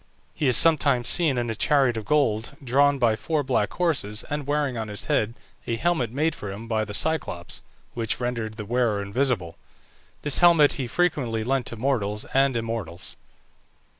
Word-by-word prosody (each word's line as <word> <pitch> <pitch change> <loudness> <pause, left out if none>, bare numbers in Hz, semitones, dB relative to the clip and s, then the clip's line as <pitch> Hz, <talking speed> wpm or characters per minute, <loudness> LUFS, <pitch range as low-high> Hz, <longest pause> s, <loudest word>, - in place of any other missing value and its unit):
He 150 - -1
is 125 -4 +6
sometimes 145 -7 +4
seen 155 -7 +3
in 120 -1 -1
a - - -2
chariot 135 0 +2
of 110 -2 -5
gold, 135 -1 0
drawn 140 +3 +3
by 120 -4 +2
four 150 +7 -1
black 125 -6 0
horses, 130 - -1
and 145 -2 -3
wearing 145 -3 0
on 110 -2 -4
his 105 -1 -4
head 115 +2 0 0.3
a 115 - 0
helmet 160 -3 0
made 150 +7 0
for 105 - -7
him 105 +4 -8
by 110 -1 0
the 105 - -8
Cyclops, 140 - -2 0.3
which 115 -2 -2
rendered 115 -3 -3
the 105 - -6
wearer 115 -3 0
invisible. 100 -5 -1 0.7
This 145 -2 +2
helmet 170 -4 +6
he 130 -3 -4
frequently 125 -8 0
lent 130 +1 -1
to - - -3
mortals 110 -4 -1
and 135 -2 +3
immortals. 110 -7 -5
120 Hz, 175 wpm, -24 LUFS, 110-145 Hz, 0.7 s, is